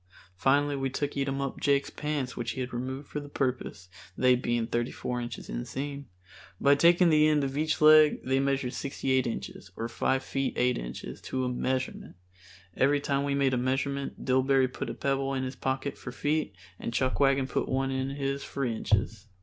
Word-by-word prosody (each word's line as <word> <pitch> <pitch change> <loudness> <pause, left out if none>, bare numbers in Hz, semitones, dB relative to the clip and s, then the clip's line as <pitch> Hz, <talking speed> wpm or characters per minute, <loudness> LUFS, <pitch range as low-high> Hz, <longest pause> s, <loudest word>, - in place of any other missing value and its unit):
Finally 140 +8 +2
we 135 -1 -1
took 145 +2 -2
Eatumup 135 -1 -2
Jake's 140 -1 +1
pants 150 -4 -3
which 120 -1 -3
he - - -6
had 125 0 -5
removed 130 +3 -4
for 150 - -4
the 145 0 -9
purpose, 125 -9 -3 0.3
they 125 0 +5
being 120 -2 0
thirty 120 +1 -1
four 125 -1 -4
inches 120 -2 -6
inseam. 140 - -5 0.5
By 140 - +5
taking 170 +3 +5
the 155 0 +5
end 150 -2 +3
of 135 0 -2
each 155 +2 0
leg 155 0 +7
they 130 +1 +1
measured 135 -2 0
sixty 135 -1 -3
eight 130 -1 +3
inches, 115 -3 -6
or 115 - -2
five 130 +3 0
feet 135 0 -2
eight 125 0 +2
inches, - - -7
to 130 -1 -2
a - - 0
measurement. 130 -2 -2 0.6
Every 145 +2 +3
time 140 -1 0
we 140 0 0
made 135 -1 +2
a - - +2
measurement 135 +2 -2
Dillbery 130 0 +3
put - - -4
a - - -5
pebble 135 0 -1
in 130 - -1
his 130 0 -4
pocket 135 +2 -3
for 125 - -7
feet 145 -6 -1 0.2
and - - -4
Chuckwagon 135 +2 +2
put - - -2
one 135 0 0
in 130 0 -1
his 140 0 -2
for 140 -1 -3
inches. 110 -1 -1
135 Hz, 190 wpm, -29 LUFS, 125-140 Hz, 0.6 s, leg